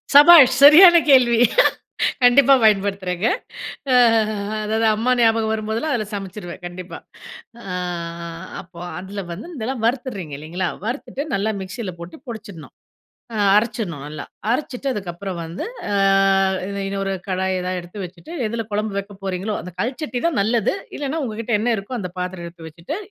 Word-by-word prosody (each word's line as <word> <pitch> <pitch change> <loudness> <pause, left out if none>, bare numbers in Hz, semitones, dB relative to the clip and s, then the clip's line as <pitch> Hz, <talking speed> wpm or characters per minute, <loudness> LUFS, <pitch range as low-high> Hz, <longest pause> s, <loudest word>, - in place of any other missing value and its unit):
சபாஷ் 290 -4 +9
சரியான 345 +5 +10
கேள்வி! 240 -4 +5 0.8
கண்டிப்பா 270 +2 +6
பயன்படுத்துறேங்க. 195 -2 +1 0.7
அ, - - +5 0.7
அதாவது 220 +1 0
அம்மா 240 +4 0
ஞாபகம் 225 -1 +3
வரும்போதெல்லாம், 220 +7 -2
அதில 215 -3 -2
சமைச்சிருவேன் 190 -2 -7
கண்டிப்பா. 175 +1 -8 0.6
அ - - -13 1.0
அப்போ, 175 -1 -15 0.2
அதில 195 +2 -6
வந்து 200 - -9
இதெல்லாம் 230 0 -4
வறுத்துறீங்க 235 - -3
இல்லைங்களா? 175 +4 -3 0.2
வறுத்துட்டு 260 +3 -4
நல்லா 205 +3 0
மிக்ஸில 190 0 -6
போட்டு 170 0 -9
பொடிச்சிடணும். 200 -9 -9 0.6
அ - - -2 0.2
அரைச்சிடணும். 210 - -2
நல்லா. 150 +1 -7 0.3
அரைச்சுட்டு 265 +1 -3
அதுக்கப்புறம் 185 -2 -5
வந்து, 165 +3 -6 0.3
அ - - 0 0.9
இன்னொரு 195 0 -2
கடாய் 190 0 -1
ஏதாவது 185 0 -3
எடுத்து 185 +3 -8
வச்சுட்டு, 185 - -12
எதில 225 0 -4
குழம்பு 210 -1 -2
வைக்க 200 0 -9
போறீங்களோ, 190 +3 -2
அந்த 180 -1 -10
கல்ச்சட்டி 255 +1 -3
தான் 295 -11 0
நல்லது. 225 - +1 0.2
இல்லன்னா 290 +2 -3
உங்க 215 -3 -6
கிட்ட 230 +1 -3
என்ன 240 +1 +1
இருக்கோ 225 +5 -5
அந்த 180 -2 -5
பாத்திரம் 180 -1 -5
எடுத்து 165 -1 -11
வச்சுட்டு, 170 - -6
210 Hz, 140 wpm, -21 LUFS, 185-240 Hz, 1.0 s, சரியான